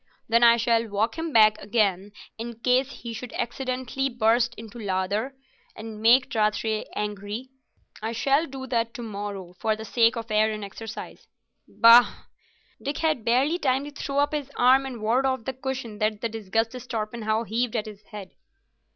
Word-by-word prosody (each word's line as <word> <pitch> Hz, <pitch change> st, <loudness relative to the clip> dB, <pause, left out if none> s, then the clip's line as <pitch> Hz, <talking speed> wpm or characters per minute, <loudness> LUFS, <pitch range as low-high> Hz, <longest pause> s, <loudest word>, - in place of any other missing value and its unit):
Then 230 Hz, +1 st, +3 dB
I 235 Hz, 0 st, +7 dB
shall 230 Hz, 0 st, +1 dB
walk 210 Hz, +2 st, -1 dB
him 325 Hz, 0 st, -4 dB
back 215 Hz, -3 st, +5 dB
again, 205 Hz, -2 st, 0 dB, 0.3 s
in 235 Hz, 0 st, -6 dB
case 255 Hz, +2 st, +2 dB
he 235 Hz, -1 st, -5 dB
should 235 Hz, +2 st, -7 dB
accidentally 255 Hz, +2 st, -2 dB
burst 240 Hz, 0 st, +2 dB
into 225 Hz, +1 st, -10 dB
a -, -, -7 dB
lather 200 Hz, +6 st, -2 dB, 0.4 s
and 220 Hz, -1 st, -8 dB
make 245 Hz, +3 st, +5 dB
Rathray 215 Hz, 0 st, 0 dB
angry. 210 Hz, +4 st, -4 dB, 0.5 s
I 220 Hz, +1 st, -2 dB
shall 275 Hz, +7 st, +1 dB
do 265 Hz, -1 st, -7 dB
that 230 Hz, -2 st, -1 dB
to 240 Hz, -, -6 dB
morrow, 200 Hz, -4 st, -6 dB
for 220 Hz, -1 st, +1 dB
the 220 Hz, +1 st, -8 dB
sake 230 Hz, 0 st, +3 dB
of 230 Hz, -1 st, -6 dB
air 215 Hz, +1 st, +3 dB
and 215 Hz, -1 st, -5 dB
exercise." 215 Hz, +2 st, -9 dB, 0.4 s
"Bah!" 235 Hz, +1 st, +6 dB, 0.6 s
Dick 280 Hz, +1 st, -3 dB
had 310 Hz, -7 st, 0 dB
barely 265 Hz, +9 st, +2 dB
time 265 Hz, -2 st, +1 dB
to 290 Hz, -, -8 dB
throw 280 Hz, 0 st, -5 dB
up 290 Hz, +1 st, +2 dB
his 290 Hz, -2 st, -3 dB
arm 260 Hz, +2 st, +5 dB
and 240 Hz, -5 st, -7 dB
ward 250 Hz, +5 st, +2 dB
off 260 Hz, -3 st, -2 dB
the 265 Hz, -, -3 dB
cushion 255 Hz, -4 st, -5 dB
that 215 Hz, -1 st, 0 dB
the 230 Hz, -, -1 dB
disgusted 225 Hz, +3 st, -2 dB
Torpenhow 220 Hz, 0 st, -2 dB
heaved 235 Hz, +2 st, -2 dB
at 220 Hz, -1 st, -1 dB
his 210 Hz, -2 st, -10 dB
head. 205 Hz, -3 st, -9 dB
230 Hz, 175 wpm, -25 LUFS, 215-255 Hz, 0.6 s, I